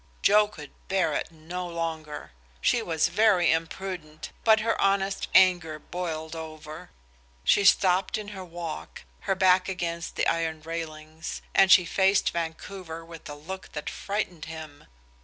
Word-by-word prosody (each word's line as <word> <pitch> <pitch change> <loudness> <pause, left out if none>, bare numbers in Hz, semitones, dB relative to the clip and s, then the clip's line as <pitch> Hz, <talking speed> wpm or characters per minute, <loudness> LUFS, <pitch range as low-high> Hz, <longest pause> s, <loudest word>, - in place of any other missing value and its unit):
Joe 210 +1 +6
could 150 -9 -11 0.2
bear 190 -1 +1
it - - -2
no 170 +3 -6
longer. 160 - -5 0.3
She 240 - +2
was 165 -6 +1
very 205 -6 +4
imprudent, 165 -1 -4
but 220 -1 +5
her 225 +1 0
honest 195 0 +1
anger 175 -4 +5
boiled 160 -1 -5
over. 155 -1 -8 0.5
She 200 - +4
stopped 190 0 +4
in 210 -1 -6
her 195 -2 -7
walk, 170 -2 -7 0.3
her 195 - +3
back 185 0 +4
against 170 -2 -3
the - - +1
iron 160 -2 0
railings, 160 -1 -6
and 195 -1 +5
she 185 - +8
faced 195 +3 +3
Vancouver 165 0 -5
with 165 -2 -11
a 145 - -6
look 185 +6 -8
that 150 - -4
frightened 200 -6 -3
him. 155 -2 -9
170 Hz, 145 wpm, -27 LUFS, 160-190 Hz, 0.5 s, she